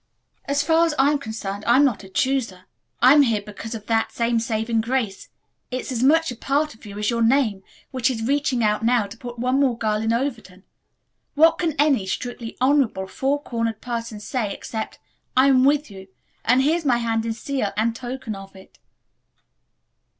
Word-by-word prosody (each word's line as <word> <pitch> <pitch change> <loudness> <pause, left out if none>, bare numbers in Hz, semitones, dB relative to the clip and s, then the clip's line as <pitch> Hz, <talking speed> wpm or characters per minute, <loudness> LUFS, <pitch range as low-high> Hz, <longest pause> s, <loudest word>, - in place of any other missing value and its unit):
"As 285 +1 0
far 325 +2 +3
as 310 - -2
I 275 +2 +4
am 295 - 0
concerned 215 -4 -5
I'm 255 +5 +6
not 235 -7 -1
a 190 - -12
'chooser.' 230 -5 -1 0.4
I'm 280 +4 +8
here 225 -6 +1
because 215 +2 -7
of 215 -2 -8
that 225 0 0
same 235 0 0
saving 225 0 -1
grace 225 -4 -2 0.4
it's 255 +1 -4
as 240 -2 -2
much 320 +3 +4
a - - -6
part 285 +6 -1
of 220 -1 -15
you 200 0 -9
as 210 +2 0
your 230 0 -1
name 225 -4 +2 0.3
which 255 -1 +1
is 225 -4 -3
reaching 275 -2 +1
out 210 +1 +1
now 235 -2 +3
to 200 +2 -10
put 240 +1 -9
one 255 +3 +1
more 260 -4 +2
girl 215 -2 0
in 225 +1 0
Overton. 230 -7 -3 0.7
What 325 +2 +5
can 330 -4 0
any 275 -9 +2
strictly 240 +2 -5
honorable, 255 -7 +2
four 275 +8 -1
cornered 230 -3 -2
person 230 -3 -5
say 215 -1 -3
except, 220 +2 -6 0.4
'I'm 260 -1 +5
with 290 -3 +2
you,' 190 -1 -11 0.4
and 250 +3 +3
here's 325 +4 +1
my 255 -5 +3
hand 225 -1 -1
in 230 0 -2
seal 235 -2 -2
and 225 +1 +1
token 250 -2 -5
of 195 0 -11
it." 190 - -17
235 Hz, 185 wpm, -23 LUFS, 220-275 Hz, 0.7 s, I'm